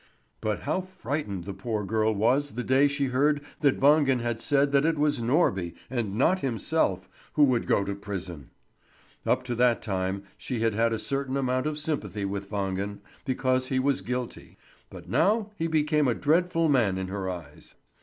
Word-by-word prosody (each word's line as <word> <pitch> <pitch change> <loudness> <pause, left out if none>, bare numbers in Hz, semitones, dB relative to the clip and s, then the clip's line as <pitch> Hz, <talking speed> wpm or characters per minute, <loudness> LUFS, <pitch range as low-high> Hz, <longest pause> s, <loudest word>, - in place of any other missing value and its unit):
But 110 -2 -1
how 155 +6 -1
frightened 145 - -4
the 100 +2 -6
poor 105 +1 -3
girl 110 +2 +1
was 125 +6 +1
the 125 - -2
day 135 +3 +4
she 140 0 -1
heard 145 +3 +3 0.2
that 140 -2 +2
Wangen 140 -2 +4
had 120 -1 -2
said 145 -1 +2
that 140 0 +4
it 160 0 +1
was 145 -3 +1
Norby, 115 - +1 0.2
and 115 -6 -2
not 170 - +3
himself, 115 - 0 0.3
who 150 - +4
would 130 -4 +2
go 100 - +3
to 100 - -3
prison. 95 -8 -6 0.8
Up 130 - +2
to 125 -1 -3
that 120 -1 +3
time 95 -1 -2
she 125 -4 -4
had 115 -1 +2
had 115 +2 +2
a 115 - 0
certain 135 +4 -2
amount 130 +1 0
of 155 -1 -2
sympathy 110 - -3
with 100 0 -4
Wangen, 100 0 -3 0.2
because 130 -1 0
he 130 - -1
was 135 +1 +1
guilty; 125 0 -5 0.3
but - - -11
now 215 +1 +2
he 165 -4 -1
became 150 -2 +2
a 120 - +2
dreadful 165 +2 +2
man 115 -10 +2
in 95 0 -4
her 95 -1 -3
eyes. 80 -5 -9
125 Hz, 185 wpm, -27 LUFS, 100-145 Hz, 0.8 s, day